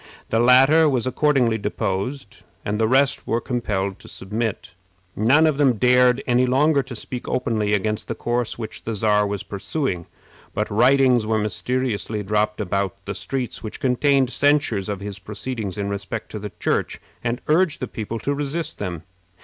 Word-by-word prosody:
The 115 - +1
latter 135 +6 +6
was 130 -4 0
accordingly 130 -4 +2
deposed, 100 +4 -3 0.3
and 105 +1 -1
the 110 - +3
rest 135 +3 +2
were 115 - +1
compelled 100 -6 -2
to - - -14
submit. 105 +1 -4 0.4
None 130 +9 +4
of 155 -3 +2
them 140 -4 +4
dared 125 +2 +4
any 125 +1 +3
longer 140 +3 +3
to 130 -1 -8
speak 125 +3 -6
openly 110 -4 0
against 105 +1 -1
the - - -3
course 120 -1 -2
which 110 -2 -7
the 115 - -4
Czar 105 0 +2
was 100 -1 -3
pursuing, 100 - -3 0.5
but - - -1
writings 125 0 +4
were 110 0 +1
mysteriously 110 0 -2
dropped 105 +1 0
about 100 -1 -1
the 100 - -3
streets 120 +8 -4
which 110 - -7
contained 135 0 +2
censures 140 -10 +1
of 100 -1 -4
his 100 -1 -6
proceedings 105 0 -5
in 100 -1 -2
respect 100 +3 -5
to 105 - -5
the 105 -1 -6
Church, - - -1 0.2
and 120 +1 -1
urged 165 +1 +2
the 130 - -3
people 110 0 -5
to 140 +5 -2
resist 145 +3 -3
them. 90 -5 -4
115 Hz, 170 wpm, -22 LUFS, 105-130 Hz, 0.5 s, latter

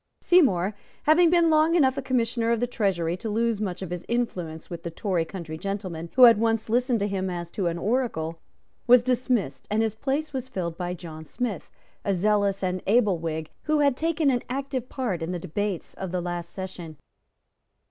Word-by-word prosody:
Seymour, 210 - +4 0.3
having 325 +3 +5
been 340 -1 +4
long 315 +2 +4
enough 265 -6 +4
a 275 - -2
Commissioner 235 -3 0
of 235 - +2
the 245 - +1
Treasury 190 -8 0
to 220 - -5
lose 225 0 0
much 190 -2 -3
of 180 - -6
his 180 0 -4
influence 180 -10 -2
with 170 - -7
the 170 - -5
Tory 175 -1 -1
country 160 -3 -7
gentlemen 185 -4 -4
who 255 - +7
had 230 -3 +9
once 225 -1 0
listened 245 +1 +2
to 205 - +1
him 190 -2 -2
as 175 -1 -5
to 190 -4 -1
an 170 0 -1
oracle, 170 -7 -1 0.5
was 245 0 +7
dismissed, 245 - 0
and 220 +2 +2
his 220 -2 0
place 285 +6 -2
was 260 -1 -3
filled 170 -8 -3
by 180 0 -3
John 160 -2 -9
Smith, 215 - -4 0.3
a 200 - +1
zealous 200 +1 +1
and 185 0 -1
able 205 -4 +3
Whig, 160 -1 -4
who 305 -1 +2
had 280 -3 +3
taken 320 -1 +1
an 245 -2 0
active 265 -1 -3
part 225 -11 -2
in 165 +2 -3
the - - -2
debates 190 +3 -3
of 190 -2 -6
the 180 - -1
late 175 -1 -3
session. 175 -3 -8
205 Hz, 200 wpm, -26 LUFS, 175-250 Hz, 0.5 s, had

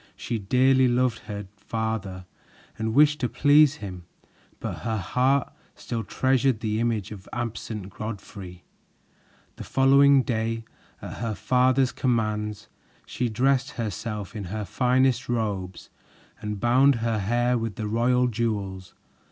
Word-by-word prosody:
She 115 - -3
dearly 130 +5 +3
loved 125 -1 +1
her 105 -1 -5
father 100 -4 -4 0.5
and 110 +1 -3
wished 150 +1 +5
to 125 - -1
please 145 +3 +5
him, 90 - -8 0.5
but - - -5
her 110 -1 -2
heart 125 +8 +1 0.2
still 115 -1 -4
treasured 130 -2 +1
the 110 -1 -1
image 115 -4 -1
of 100 -3 -9
the - - -10
absent 110 -4 -5
Godfrey. 100 -4 -8 0.9
The - - -7
following 135 0 +5
day, 115 -1 -2 0.4
at - - -7
her 115 -2 -3
father's 130 +2 +2
commands, 105 -4 -1 0.4
she 125 -1 -2
dressed 130 +4 +1
herself 105 -3 -4
in 105 -3 -5
her 105 +3 -4
finest 130 +3 +1
robes 100 -6 -3 0.5
and 105 -1 -4
bound 130 +5 +4
her 115 -2 0
hair 120 +5 +1
with 115 -4 -2
the 110 - -4
royal 125 +3 +2
jewels. 100 -5 -3
115 Hz, 135 wpm, -25 LUFS, 105-125 Hz, 0.9 s, wished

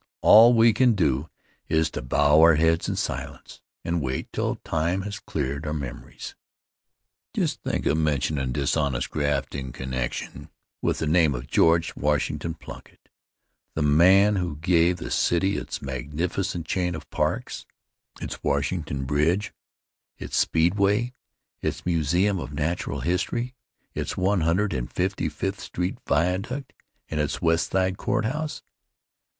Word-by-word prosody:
All 115 +3 +8
we 115 0 +6
can 125 +2 +4
do 75 -4 0 0.4
is 80 0 +1
to - - -5
bow 75 +4 +3
our 80 0 +7
heads 80 +2 +2
in - - -1
silence - - -5 0.2
and 85 0 0
wait 65 -2 -4
till - - -1
time 85 +4 -1
has 100 0 -5
cleared 70 0 -3
our 75 - -2
memories. 70 -5 -7 1.0
Just - - -1
think - - -2
of 80 - +2
mentionin' 70 -3 0
dishonest 70 -1 0
graft 70 -2 -1
in 65 -2 -5
connection 65 -1 -5 0.3
with - - 0
the - - -2
name 80 -3 +3
of - - -6
George 85 0 +3
Washington 75 +2 -1
Plunkitt, - - -13 0.7
the 75 - 0
man 95 +8 +5
who 90 -5 -2
gave 85 +2 +2
the 85 - -7
city 95 +3 +2
its - - -5
magnificent 80 +7 -3
chain 90 +1 -1
of 75 -2 -9
parks, - - -2 0.5
its - - -6
Washington 70 -1 -1
Bridge, 80 +9 +1 0.6
its - - -6
Speedway, 100 +8 +2 0.5
its - - -3
Museum 90 +4 +1
of 70 - -6
Natural 80 +4 -2
History, 105 +8 -1 0.4
its - - -4
One 95 0 +2
Hundred 85 +4 +1
and 60 -3 -3
Fifty 95 +2 -1
fifth 95 +1 -3
Street 90 +1 -4
Viaduct 95 +11 -1 0.3
and 75 - -3
its 75 -1 -1
West 80 0 +1
Side 95 0 +1
Courthouse! 150 +11 -2
80 Hz, 140 wpm, -25 LUFS, 75-95 Hz, 1.0 s, All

